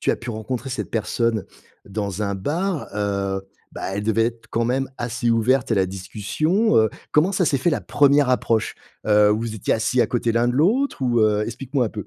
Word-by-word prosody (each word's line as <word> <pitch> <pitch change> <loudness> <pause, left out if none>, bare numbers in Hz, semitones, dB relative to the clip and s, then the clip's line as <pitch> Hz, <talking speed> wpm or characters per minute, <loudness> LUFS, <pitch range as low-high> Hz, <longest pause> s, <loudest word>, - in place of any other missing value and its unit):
tu - - +1
as - - 0
pu 120 0 -7
rencontrer 120 +4 -4
cette 130 - -4
personne 110 -1 0 0.4
dans 100 0 -4
un 100 -1 -1
bar, 160 - -2
heu, 100 -2 -1 0.3
bah, - - -8
elle 100 - -2
devait 115 +1 +2
être 115 -1 -6
quand 115 0 0
même 135 +3 0
assez 120 0 -2
ouverte 115 +3 +2
à - - +4
la 95 - +3
discussion. 105 - -1
Heu, 110 - +4 0.2
comment 165 +6 +3
ça 185 -2 +1
s'est 140 -3 +1
fait 135 - +1
la 145 - -1
1re 145 -1 +3
approche? 115 -2 0 0.3
Heu, 105 -1 +5
vous 110 +1 -1
étiez 110 - 0
assis 115 +3 +1
à - - +3
côté 120 -1 0
l'un 120 +1 +2
de 120 - -1
l'autre? 210 - +1
Ou, 120 -2 +2
heu 105 -1 +3
explique-moi 130 +3 -2
un - - -3
peu. 105 -3 -7
115 Hz, 215 wpm, -22 LUFS, 105-135 Hz, 0.4 s, Heu